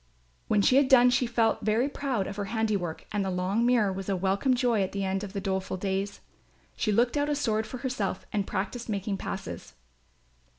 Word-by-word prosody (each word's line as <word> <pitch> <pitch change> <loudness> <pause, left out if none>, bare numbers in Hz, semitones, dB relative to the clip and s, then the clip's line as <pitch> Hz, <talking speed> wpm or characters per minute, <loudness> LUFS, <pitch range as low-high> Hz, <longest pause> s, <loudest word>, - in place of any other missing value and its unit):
When 210 -2 +3
she 255 - +5
had 280 -1 +5
done 250 -2 +6
she 250 0 +2
felt 230 -1 +1
very 220 +5 +2
proud 270 -7 -2
of 200 - -6
her 205 - -2
handiwork 205 -6 -2
and 205 -2 0
the 190 - -2
long 185 +5 0
mirror 220 -6 +3
was 195 +1 -5
a 195 - +1
welcome 195 +8 +1
joy 240 -4 +2
at 190 - -2
the 200 0 -2
end 190 +1 -1
of 200 -1 -7
the 200 - -2
doleful 190 -1 -2
days. 195 +1 -2 0.5
She 215 - 0
looked 240 +6 +2
out 290 +1 +1
a 295 - +1
sword 220 -6 0
for 255 - -6
herself 240 -7 -3
and 205 -2 0
practised 210 +5 -3
making 200 -1 -2
passes. 195 -1 -6
210 Hz, 210 wpm, -28 LUFS, 195-245 Hz, 0.5 s, done